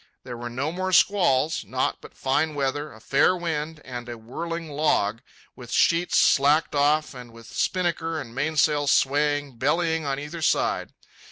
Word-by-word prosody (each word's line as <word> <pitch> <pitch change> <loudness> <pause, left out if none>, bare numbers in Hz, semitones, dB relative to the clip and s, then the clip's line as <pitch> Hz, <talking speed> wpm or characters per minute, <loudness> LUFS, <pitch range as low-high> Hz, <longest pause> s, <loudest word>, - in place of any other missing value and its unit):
There 125 -2 -7
were 120 0 -6
no 135 +6 -3
more 185 +2 -3
squalls, 165 -7 +3
naught - - -1
but - - -14
fine 150 +3 0
weather, 145 +2 -2
a 110 - -14
fair 140 +9 +3
wind, 160 -2 -3
and 120 -1 -7
a 120 - -6
whirling 165 +9 -6
log, 120 -7 +1 0.3
with 125 -2 -11
sheets 170 +1 +2
slacked 145 +3 +4
off 150 +2 +2
and 125 -2 -10
with 115 0 -14
spinnaker 165 -1 -1
and 115 -6 -8
mainsail 145 +1 +1
swaying 145 +1 +2
and 120 -4 -21
bellying 160 +4 +1
on 140 -2 -2
either 150 +3 -7
side. 155 - 0
145 Hz, 165 wpm, -25 LUFS, 130-160 Hz, 0.3 s, slacked